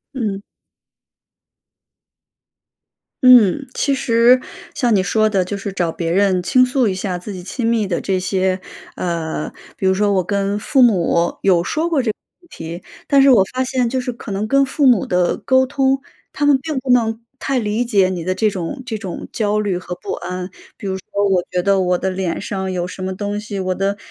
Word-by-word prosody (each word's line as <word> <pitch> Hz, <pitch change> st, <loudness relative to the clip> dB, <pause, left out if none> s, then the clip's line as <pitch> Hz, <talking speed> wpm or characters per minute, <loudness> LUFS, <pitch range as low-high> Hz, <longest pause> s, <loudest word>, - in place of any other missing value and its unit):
嗯。 205 Hz, -6 st, -3 dB, 2.8 s
嗯。 245 Hz, -7 st, +6 dB
其 280 Hz, -, 0 dB
实 245 Hz, -1 st, +4 dB, 0.4 s
像 245 Hz, -5 st, +1 dB
你 190 Hz, -, +3 dB
说 215 Hz, +3 st, +2 dB
的， 195 Hz, -3 st, +1 dB
就 205 Hz, -, -4 dB
是 200 Hz, 0 st, -5 dB
找 175 Hz, -3 st, -1 dB
别 165 Hz, 0 st, -3 dB
人 185 Hz, -1 st, +2 dB
倾 255 Hz, +6 st, +4 dB
诉 255 Hz, -1 st, +1 dB
一 195 Hz, -, 0 dB
下 185 Hz, -1 st, -3 dB
自 180 Hz, +4 st, -8 dB
己 185 Hz, -, -7 dB
亲 225 Hz, +7 st, -4 dB
密 225 Hz, -3 st, +1 dB
的 175 Hz, -3 st, -1 dB
这 190 Hz, -2 st, -1 dB
些， 185 Hz, 0 st, 0 dB, 0.4 s
呃 165 Hz, -3 st, -3 dB, 0.3 s
比 190 Hz, -, 0 dB
如 190 Hz, -, +4 dB
说， 205 Hz, +2 st, +1 dB
我 185 Hz, -2 st, +2 dB
跟 200 Hz, +2 st, -1 dB
父 265 Hz, +5 st, +2 dB
母 175 Hz, -7 st, +2 dB
有 180 Hz, -3 st, +3 dB
说 315 Hz, -, -1 dB
过 310 Hz, -5 st, +2 dB
这 225 Hz, -, +1 dB
个 -, -, -14 dB, 0.3 s
问 350 Hz, -, -23 dB
题， 170 Hz, -, -8 dB, 0.2 s
但 280 Hz, -1 st, +5 dB
是 275 Hz, -, +6 dB
我 240 Hz, -7 st, +6 dB
发 260 Hz, 0 st, 0 dB
现 255 Hz, -1 st, 0 dB
就 260 Hz, +2 st, -1 dB
是 250 Hz, -, -3 dB
可 230 Hz, -2 st, -9 dB
能 200 Hz, +2 st, -2 dB
跟 275 Hz, +4 st, +4 dB
父 280 Hz, +2 st, 0 dB
母 245 Hz, -7 st, +4 dB
的 180 Hz, -1 st, +1 dB
沟 260 Hz, 0 st, +2 dB
通， 270 Hz, 0 st, +1 dB, 0.3 s
他 295 Hz, -, -1 dB
们 285 Hz, -2 st, +4 dB
并 310 Hz, -1 st, -4 dB
不 260 Hz, -, -8 dB
能 225 Hz, -2 st, +2 dB, 0.2 s
太 270 Hz, -2 st, -1 dB
理 220 Hz, +2 st, -1 dB
解 200 Hz, -5 st, +3 dB
你 175 Hz, -3 st, -4 dB
的 185 Hz, 0 st, -1 dB
这 215 Hz, +3 st, +2 dB
种 195 Hz, +7 st, -5 dB
这 225 Hz, -4 st, -4 dB
种 190 Hz, -4 st, -6 dB
焦 210 Hz, -1 st, 0 dB
虑 200 Hz, -4 st, -1 dB
和 180 Hz, 0 st, -6 dB
不 -, -, -7 dB
安。 180 Hz, 0 st, -5 dB, 0.3 s
比 -, -, -11 dB
如 190 Hz, -1 st, -2 dB
说， 200 Hz, +2 st, -2 dB
我 185 Hz, -2 st, +3 dB
觉 180 Hz, -1 st, -1 dB
得， 195 Hz, 0 st, +3 dB
我 180 Hz, -1 st, +1 dB
的 190 Hz, -, -2 dB
脸 185 Hz, -2 st, -3 dB
上 190 Hz, -1 st, -3 dB
有 175 Hz, -1 st, -2 dB
什 185 Hz, +1 st, -8 dB
么 185 Hz, 0 st, -3 dB
东 205 Hz, +1 st, -3 dB
西， 210 Hz, -1 st, -6 dB
我 185 Hz, -1 st, -1 dB
的， 195 Hz, +2 st, -1 dB
200 Hz, 225 characters per minute, -19 LUFS, 185-245 Hz, 2.8 s, 嗯